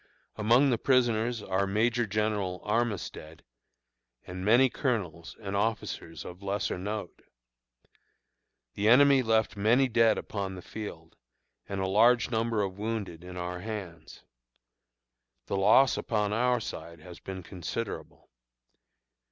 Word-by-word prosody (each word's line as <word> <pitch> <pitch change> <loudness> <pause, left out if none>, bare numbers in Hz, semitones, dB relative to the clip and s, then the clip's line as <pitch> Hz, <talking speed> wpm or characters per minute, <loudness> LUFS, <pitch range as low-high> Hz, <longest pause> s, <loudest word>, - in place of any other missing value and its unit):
Among 120 +6 +4
the 120 - +1
prisoners 120 -3 +1
are 95 0 0
Major 115 +3 +1
General 105 -3 -1
Armistead, 105 -8 -3 0.8
and 90 +1 -7
many 120 +6 +5
colonels 95 - -3
and 100 -2 -5
officers 100 -6 -3
of 90 +2 -9
lesser 100 -2 -2
note. 105 +3 -5 1.5
The 105 +2 +1
enemy 140 +2 +6
left 110 -3 +1
many 115 +6 +3
dead 115 -2 +3
upon 95 -2 -4
the 90 - -9
field, 85 -7 -8 0.5
and 100 - -3
a 95 - 0
large 115 +4 +4
number 115 -2 0
of 95 0 -5
wounded 105 -6 -4
in 90 0 -9
our 90 0 -4
hands. 90 -6 -8 1.2
The - - -3
loss 130 +7 +5
upon 105 -2 -1
our 125 +2 +2
side 85 -6 -8
has 90 +1 -11
been 95 -1 -7
considerable. 95 +6 -6
105 Hz, 125 wpm, -29 LUFS, 95-115 Hz, 1.5 s, enemy